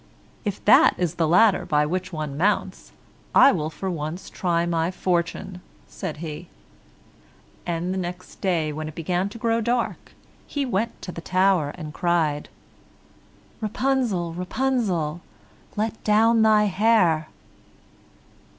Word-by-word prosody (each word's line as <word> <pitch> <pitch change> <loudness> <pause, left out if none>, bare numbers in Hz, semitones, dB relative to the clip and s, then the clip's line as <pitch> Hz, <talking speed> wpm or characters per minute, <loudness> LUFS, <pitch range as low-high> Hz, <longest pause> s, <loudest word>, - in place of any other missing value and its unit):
"If 205 -4 -4
that - - +6
is 175 -3 -1
the 165 -2 0
ladder 190 +5 +4
by 150 -4 +1
which 185 +4 -3
one 155 -4 -4
mounts, 195 +8 -1 0.4
I 275 - +8
will 155 - -2
for 190 +4 -6
once 170 +1 -4
try 170 -2 0
my 165 -1 0
fortune," 180 +1 -2 0.3
said 180 -7 -6
he, 155 +3 -7 1.2
and 175 +2 -2
the 190 - -2
next 180 0 -7
day, 165 -5 0
when 155 +1 -5
it 155 - -9
began 180 +4 -1
to 210 - -10
grow 230 0 0
dark, 240 +2 -2 0.3
he 285 -1 -2
went 230 -1 -2
to 180 - -5
the 170 - -8
tower 185 -4 +2
and 155 -3 -7
cried. 165 -5 0 1.1
"Rapunzel, 220 -6 0
Rapunzel, 180 - -1 0.5
Let 220 +1 -3
down 225 +2 +4
your 215 -1 +5
hair." 190 -6 +3
180 Hz, 130 wpm, -24 LUFS, 165-210 Hz, 1.2 s, I